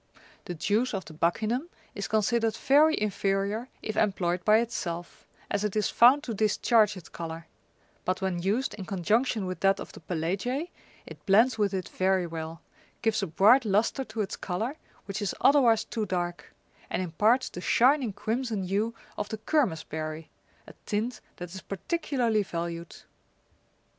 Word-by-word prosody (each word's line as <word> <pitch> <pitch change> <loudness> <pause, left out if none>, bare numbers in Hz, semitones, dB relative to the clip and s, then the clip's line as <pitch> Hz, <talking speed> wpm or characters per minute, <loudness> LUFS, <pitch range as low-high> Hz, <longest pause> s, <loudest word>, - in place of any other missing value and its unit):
The 175 - -5
juice 210 +8 0
of 190 - -4
the 160 - -11
buccinum 220 - 0 0.2
is 200 - -4
considered 225 +1 +1
very 305 +4 +4
inferior 200 +3 -1
if 215 - -3
employed 180 -4 0
by 215 +3 +6
itself, 175 -7 -4 0.2
as 205 0 0
it 210 -1 -2
is 215 - +1
found 260 +5 +6
to 240 - -4
discharge 215 0 +3
its 175 - -11
colour; 165 0 -7 0.6
but 185 - -1
when 190 -3 -2
used 215 +9 0
in 195 - -7
conjunction 210 +4 +1
with 185 -2 -4
that 195 +1 +3
of - - -7
the - - -12
pelagiae, 195 - -2 0.3
it - - -12
blends 225 +6 +5
^^ - - -16
with 205 -2 +2
it 185 - -3
very 190 -1 +1
well, 165 0 -6 0.4
gives 220 -1 +2
a 195 - -1
bright 215 - +5
lustre 220 +6 +1
to 215 -1 -4
its 200 - -3
colour, 220 +10 -3 0.3
which 195 +2 -4
is 205 - -2
otherwise 250 -6 +5
too 220 -2 -3
dark, 175 -1 -3 0.4
and 185 - -1
imparts 215 +9 +2
the 180 - -8
shining 255 +3 +3
crimson 220 +1 -2
hue 205 +5 -1 0.2
of 210 - -3
the 220 - -4
kermes 215 - +1
berry, 155 0 -6 0.3
a - - -13
tint 215 +2 -2
that 175 -1 -8
is 190 - -7
particularly 240 - -1
valued. 170 -2 -5
205 Hz, 165 wpm, -28 LUFS, 180-230 Hz, 0.6 s, by